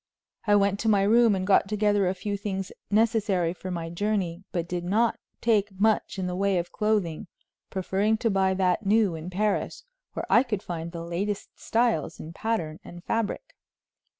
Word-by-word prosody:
I 205 Hz, -, +5 dB
went 200 Hz, 0 st, +2 dB
to 225 Hz, -, +1 dB
my 200 Hz, -2 st, +4 dB
room 225 Hz, +1 st, +5 dB
and 185 Hz, 0 st, -2 dB
got 195 Hz, 0 st, +4 dB
together 205 Hz, -1 st, +2 dB
a 190 Hz, -, -2 dB
few 205 Hz, +2 st, -3 dB
things 195 Hz, -1 st, -4 dB, 0.2 s
necessary 210 Hz, -5 st, +2 dB
for 185 Hz, +1 st, -8 dB
my 165 Hz, -2 st, -4 dB
journey, 190 Hz, -2 st, -1 dB
but 170 Hz, -2 st, -2 dB
did 175 Hz, -1 st, -3 dB
not 220 Hz, +6 st, +1 dB, 0.2 s
take 205 Hz, -4 st, +1 dB
much 215 Hz, -1 st, +2 dB
in 190 Hz, -, -2 dB
the 180 Hz, 0 st, -2 dB
way 195 Hz, 0 st, +1 dB
of 175 Hz, 0 st, -2 dB
clothing, 210 Hz, -7 st, 0 dB, 0.4 s
preferring 195 Hz, +3 st, 0 dB
to 230 Hz, 0 st, 0 dB
buy 190 Hz, -1 st, +2 dB
that 185 Hz, +1 st, +1 dB
new 205 Hz, -2 st, +3 dB
in 160 Hz, +2 st, -6 dB
Paris, 205 Hz, +3 st, -1 dB, 0.3 s
where -, -, -4 dB
I 235 Hz, -, +6 dB
could 225 Hz, -7 st, -3 dB
find 170 Hz, -1 st, -5 dB
the 170 Hz, -1 st, -6 dB
latest 195 Hz, +4 st, -3 dB
styles 225 Hz, -9 st, 0 dB
in 160 Hz, +2 st, -8 dB
pattern 170 Hz, -7 st, -2 dB
and 175 Hz, 0 st, -11 dB
fabric. 225 Hz, 0 st, -2 dB
195 Hz, 180 wpm, -26 LUFS, 180-210 Hz, 0.4 s, I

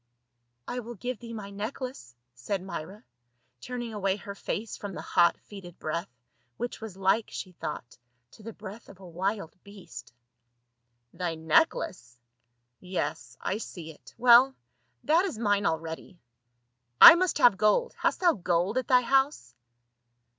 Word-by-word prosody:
"I 250 Hz, -, -3 dB
will 240 Hz, 0 st, -8 dB
give 245 Hz, +3 st, -5 dB
thee 235 Hz, -1 st, -9 dB
my 210 Hz, -3 st, -7 dB
necklace," 215 Hz, -, -6 dB, 0.2 s
said 180 Hz, +11 st, -4 dB
Myra, 190 Hz, +3 st, -7 dB, 0.6 s
turning 240 Hz, -2 st, -5 dB
away 195 Hz, -2 st, 0 dB
her 200 Hz, 0 st, -8 dB
face 210 Hz, +2 st, -4 dB
from 200 Hz, -3 st, -7 dB
the -, -, -6 dB
hot 170 Hz, 0 st, +3 dB
fetid 190 Hz, -4 st, -12 dB
breath, 170 Hz, +4 st, -4 dB, 0.5 s
which 240 Hz, -1 st, -5 dB
was 215 Hz, -4 st, -8 dB
like, 195 Hz, +3 st, +1 dB
she 185 Hz, -, -7 dB
thought, 150 Hz, -8 st, -7 dB, 0.3 s
to -, -, -17 dB
the 225 Hz, +2 st, -7 dB
breath 210 Hz, +1 st, -11 dB
of 195 Hz, -, -14 dB
a 190 Hz, -, -12 dB
wild 180 Hz, 0 st, -3 dB
beast. 175 Hz, -, -12 dB, 0.5 s
" 120 Hz, 0 st, -50 dB
Thy 175 Hz, -3 st, -3 dB
necklace? 160 Hz, -, 0 dB, 0.6 s
Yes, 185 Hz, 0 st, -4 dB
I 200 Hz, -, -2 dB
see 165 Hz, -7 st, -8 dB
it. 155 Hz, -, -17 dB
Well, 250 Hz, +2 st, +6 dB, 0.5 s
that 330 Hz, +4 st, +3 dB
is 365 Hz, -, -3 dB
mine 205 Hz, -2 st, +1 dB
already. 165 Hz, +2 st, -4 dB, 0.8 s
I -, -, +13 dB
must 365 Hz, +1 st, +1 dB
have 240 Hz, -5 st, +6 dB
gold; 215 Hz, -, +2 dB
hast -, -, -1 dB
thou 350 Hz, -2 st, +5 dB
gold 180 Hz, -, 0 dB
at 255 Hz, -, -5 dB
thy 250 Hz, -1 st, +5 dB
house 265 Hz, -, +1 dB
200 Hz, 150 wpm, -28 LUFS, 170-235 Hz, 0.8 s, I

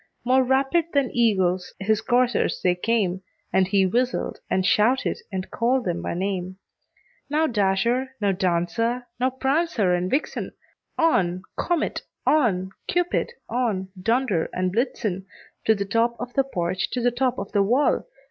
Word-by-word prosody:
More 260 Hz, +1 st, +4 dB
rapid 270 Hz, +6 st, +2 dB
than 280 Hz, -3 st, +2 dB
eagles 190 Hz, -6 st, +1 dB
his 210 Hz, +2 st, +1 dB
coursers 245 Hz, 0 st, +1 dB
they 180 Hz, -, +4 dB
came, 190 Hz, -1 st, 0 dB, 0.3 s
And 190 Hz, -1 st, +3 dB
he 195 Hz, 0 st, +3 dB
whistled, 245 Hz, +6 st, -1 dB
and 185 Hz, -1 st, +1 dB
shouted, 225 Hz, +6 st, +2 dB
and 190 Hz, -1 st, -4 dB
called 245 Hz, +1 st, +1 dB
them 175 Hz, -2 st, -1 dB
by -, -, -3 dB
name; 185 Hz, 0 st, -3 dB, 0.7 s
"Now, 305 Hz, +2 st, +2 dB
Dasher! 235 Hz, +3 st, +1 dB
now, 205 Hz, -2 st, +2 dB
Dancer! 195 Hz, +7 st, 0 dB
now, 255 Hz, +1 st, +2 dB
Prancer 265 Hz, -, +1 dB
and 180 Hz, +1 st, 0 dB
Vixen! 275 Hz, +7 st, -2 dB, 0.4 s
On! 185 Hz, -, +2 dB
Comet, 345 Hz, -3 st, -1 dB, 0.2 s
on! 195 Hz, -11 st, +2 dB, 0.2 s
Cupid, 355 Hz, +6 st, 0 dB, 0.2 s
on! 215 Hz, -7 st, -1 dB
Dunder 225 Hz, -5 st, +1 dB
and 185 Hz, 0 st, 0 dB
Blitzen 215 Hz, -5 st, -1 dB, 0.4 s
To 220 Hz, -, +5 dB
the 200 Hz, -1 st, -2 dB
top 230 Hz, +4 st, +1 dB
of 245 Hz, +1 st, -6 dB
the 275 Hz, -, +2 dB
porch, 180 Hz, -7 st, -2 dB
to 250 Hz, -, 0 dB
the 245 Hz, 0 st, +2 dB
top 255 Hz, +1 st, 0 dB
of 200 Hz, -, -5 dB
the 205 Hz, -, +3 dB
wall! 250 Hz, -, +2 dB
225 Hz, 150 wpm, -24 LUFS, 190-255 Hz, 0.7 s, To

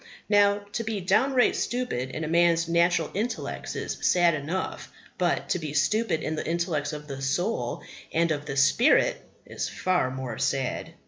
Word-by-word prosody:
Now, 205 Hz, 0 st, +4 dB
to 230 Hz, -, -2 dB
be 220 Hz, -2 st, -3 dB
downright 245 Hz, +8 st, +3 dB
stupid 240 Hz, -, -2 dB
in 155 Hz, +4 st, -5 dB
a -, -, -2 dB
man's 170 Hz, 0 st, +3 dB
natural 170 Hz, -1 st, +2 dB
intellects 225 Hz, +5 st, -3 dB
is -, -, -4 dB
sad 175 Hz, -1 st, +4 dB
enough, 155 Hz, +5 st, -4 dB, 0.3 s
but 175 Hz, -1 st, 0 dB
to -, -, +1 dB
be 155 Hz, -3 st, -5 dB
stupid 215 Hz, -6 st, +1 dB
in 160 Hz, -, -2 dB
the -, -, -4 dB
intellects 165 Hz, -3 st, -1 dB
of 150 Hz, -1 st, -7 dB
the 135 Hz, -2 st, -6 dB
soul 135 Hz, -, -1 dB, 0.3 s
and 170 Hz, 0 st, +2 dB
of 145 Hz, -1 st, -3 dB
the 135 Hz, -, -4 dB
spirit 140 Hz, -, +4 dB, 0.2 s
is -, -, -4 dB
far 185 Hz, -8 st, 0 dB
more 130 Hz, -3 st, -5 dB
sad. 135 Hz, -2 st, -2 dB
170 Hz, 170 wpm, -26 LUFS, 145-195 Hz, 0.3 s, Now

